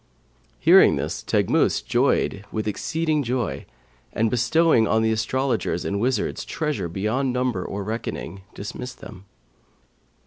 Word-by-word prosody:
Hearing - - +6
this - - -3
Teghmus - - +2
joyed 100 - +1
with 110 -1 -3
exceeding 155 +8 -1
joy 125 -4 -2 0.4
and, 110 0 0
bestowing 125 0 +3
on 110 +2 +2
the 110 - +2
astrologers 110 -3 -1
and 100 - -1
wizards 125 -1 -1
treasure 150 - -3
beyond 110 +9 -1
numbering 125 -7 -1
or 100 +1 -4
reckoning, 105 -2 -5
dismissed 125 +5 -7
them. 95 - -11
115 Hz, 125 wpm, -23 LUFS, 105-130 Hz, 0.4 s, Hearing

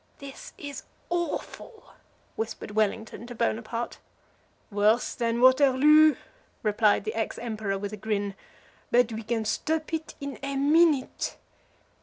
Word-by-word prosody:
"This 275 -2 -10
is 285 -1 -7 0.3
awful," 350 +6 -4 0.4
whispered 225 -1 -5
Wellington 220 +2 -1
to 245 - -8
Bonaparte. 230 0 -2 0.7
"Worse 210 +4 +2
than 235 0 -1
Waterloo," 280 +4 +6 0.5
replied 210 -1 +3
the 215 - -3
ex 225 0 -2
Emperor, 215 -4 -3
with 205 +1 -5
a - - -5
grin; 205 -1 -2 0.6
"but 240 -1 +3
we 220 - -4
can 225 0 -2
stop 310 +9 -1
it 320 0 -3
in 280 -1 -6
a 275 0 -3
minute. 295 0 +2
235 Hz, 125 wpm, -27 LUFS, 215-280 Hz, 0.7 s, Waterloo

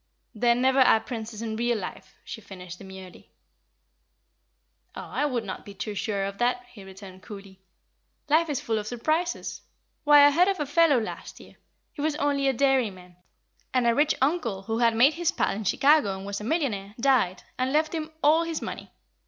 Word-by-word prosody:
"There 235 +1 +2
never 260 +2 +2
are 250 -4 +6
princes 225 -2 -7
in 220 -1 -4
real 240 0 0
life," 185 - -8
she 220 - -8
finished, 180 -3 -10
demurely. 190 -2 -12 1.7
"Oh, - - -6
I 295 - -2
would 245 -5 -2
not 190 -3 -7
be 200 - -12
too 210 +1 -5
sure 200 -1 -2
of 200 0 -6
that," 245 0 0
he 205 - -12
returned, 190 -1 -12
coolly. 195 -2 -11 0.7
"Life 315 +2 +3
is 285 - -1
full 225 -1 -2
of 210 - -7
surprises. 310 +9 -2 0.4
Why, 290 -1 +7
I 290 - +6
heard 350 +5 +4
of 390 -1 0
a 295 - -1
fellow 290 -2 +3
last 220 - -7
year - - -16 0.4
he - - -7
was 305 0 0
only 285 -2 0
a 270 - +2
dairy 265 -2 +2
man, 180 -2 -15 0.6
and 250 -2 +2
a 235 - +4
rich 295 +4 +2
uncle 265 - -1
who 225 +3 -3
had 230 -1 +3
made 260 +7 +5
his 335 +1 0
pile - - -1
in 215 +1 -6
Chicago, 275 -4 +3
and 190 - -9
was 200 +1 -5
a - - -7
millionaire, 220 - -2
died, 230 -8 +2 0.2
and 255 +1 0
left 310 +2 +1
him 315 -1 -4
all 310 +3 +5
his 330 -1 -3
money. - - -7
240 Hz, 195 wpm, -26 LUFS, 200-290 Hz, 1.7 s, Why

